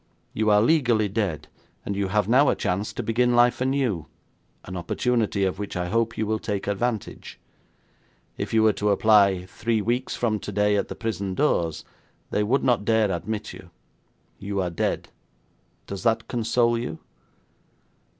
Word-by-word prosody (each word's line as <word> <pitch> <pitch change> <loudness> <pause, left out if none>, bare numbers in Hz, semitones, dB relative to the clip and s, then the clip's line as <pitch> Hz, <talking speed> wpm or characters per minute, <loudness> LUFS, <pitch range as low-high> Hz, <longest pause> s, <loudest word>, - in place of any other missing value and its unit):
You 110 0 +1
are 105 0 +5
legally 120 -7 +3
dead, 95 -6 -2 0.4
and 100 - -3
you 100 0 -1
have 105 0 +1
now 130 +5 +5
a - - +2
chance 100 +4 -2
to 120 - -5
begin 120 +2 +2
life 120 +1 +4
anew, 130 - 0 0.6
an 90 - -7
opportunity 105 +3 0
of 95 0 -1
which 105 - -5
I 90 0 -2
hope 115 +2 0
you 110 - 0
will 110 +1 -1
take 105 -3 -3
advantage. 105 +2 -3 1.0
If - - -4
you 110 -1 +3
were 110 -1 +4
to 105 - -1
apply 100 -3 +4
three 115 +4 -1
weeks 120 +5 -1
from 110 -3 0
today 105 +1 0
at 100 - 0
the - - -7
prison 100 -4 -3
doors, 85 - 0 0.5
they - - +1
would 120 +7 +1
not 120 -5 +2
dare 110 -2 +2
admit 105 +4 -4
you. - - -12 0.7
You 100 0 -3
are 90 -2 -1
dead. 85 - -2 0.8
Does 100 -1 -6
that 115 0 +1
console 120 0 +1
you?' 115 -9 -5
110 Hz, 165 wpm, -24 LUFS, 100-115 Hz, 1.0 s, are